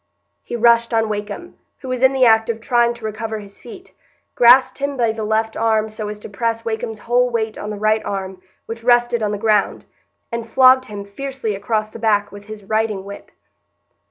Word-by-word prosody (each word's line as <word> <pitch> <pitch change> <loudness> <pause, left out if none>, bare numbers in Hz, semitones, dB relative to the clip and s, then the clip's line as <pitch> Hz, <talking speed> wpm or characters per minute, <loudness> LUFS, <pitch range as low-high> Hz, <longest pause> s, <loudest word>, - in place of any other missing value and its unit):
He - - -6
rushed 235 0 +3
on 225 -1 +1
Wakem, 210 - -6 0.2
who 260 - -7
was 255 -1 -3
in 260 0 +5
the 265 -1 +3
act 220 -1 +4
of 225 -1 -2
trying 240 +1 +1
to 235 -2 -10
recover 220 +1 -4
his 200 -1 -12
feet, 365 +10 -13 0.4
grasped 245 +3 +5
him 280 0 -3
by 230 -2 +2
the 220 0 -5
left 220 +1 -1
arm 220 -1 +1
so 215 -1 -6
as 210 0 -6
to - - -8
press 230 +3 -3
Wakem's 225 0 -3
whole 245 +3 +1
weight 225 -2 -2
on 210 - -6
the 210 - -5
right 215 +1 +1
arm, 190 -2 -5 0.2
which 230 0 -8
rested 240 -1 +3
on 210 -1 0
the 205 - -2
ground, 210 -1 +1 0.5
and 235 -1 -5
flogged 260 +1 +5
him 205 -3 -8
fiercely 260 +1 -5
across 215 +2 -2
the 230 - -10
back 205 -2 +1
with 205 0 -12
his 215 -1 -10
riding 215 -1 -1
whip. 200 0 -10
225 Hz, 205 wpm, -19 LUFS, 210-240 Hz, 0.5 s, in